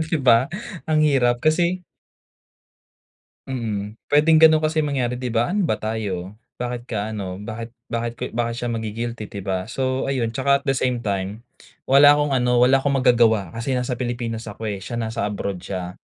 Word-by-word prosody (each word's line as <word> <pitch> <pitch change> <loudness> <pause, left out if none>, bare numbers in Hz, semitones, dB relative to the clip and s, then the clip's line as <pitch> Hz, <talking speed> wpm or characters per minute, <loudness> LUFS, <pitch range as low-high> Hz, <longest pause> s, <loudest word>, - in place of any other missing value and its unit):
'di 160 +1 0
ba? 120 +1 +5 0.4
Ang 155 -1 +3
hirap 130 -5 +3
kasi 175 +3 +2 1.6
Mm. 110 -5 -4 0.2
Puwedeng 155 +2 +5
ganun 160 0 +8
kasi 155 0 0
mangyari 130 -5 -1
'di 125 0 -4
ba? 120 +10 0
Ano 205 - +2
ba 145 - 0
tayo? 105 -4 -4 0.2
Bakit 120 -1 -3
ka 115 -3 -4 0.2
ano? 95 -3 -5
Bakit 110 +3 -7 0.2
bakit 115 -1 -3
ko - - -8
bakit 115 0 -1
siya 120 - -3
magi-guilty 115 0 -4
'di 100 - -7
ba? 95 +2 -2
So, 130 0 -1
ayun 115 -4 -1
'tsaka 140 +2 +3
at - - -38
the 135 - +2
same 125 -2 0
time, 100 +1 -4 0.4
wala 140 +2 +7
akong 145 -2 +1
ano, 125 -1 +2
wala 130 +2 +4
akong 140 -1 +1
magagawa 115 -7 +3
kasi 115 +4 -3
nasa 125 0 -2
Pilipinas 120 -2 -4
ako, 110 +2 -7
eh, 100 -2 -4
siya 120 +4 -5
nasa 115 0 -3
abroad 100 -3 -4
siya. 90 -1 -5
120 Hz, 180 wpm, -22 LUFS, 110-135 Hz, 1.6 s, ganun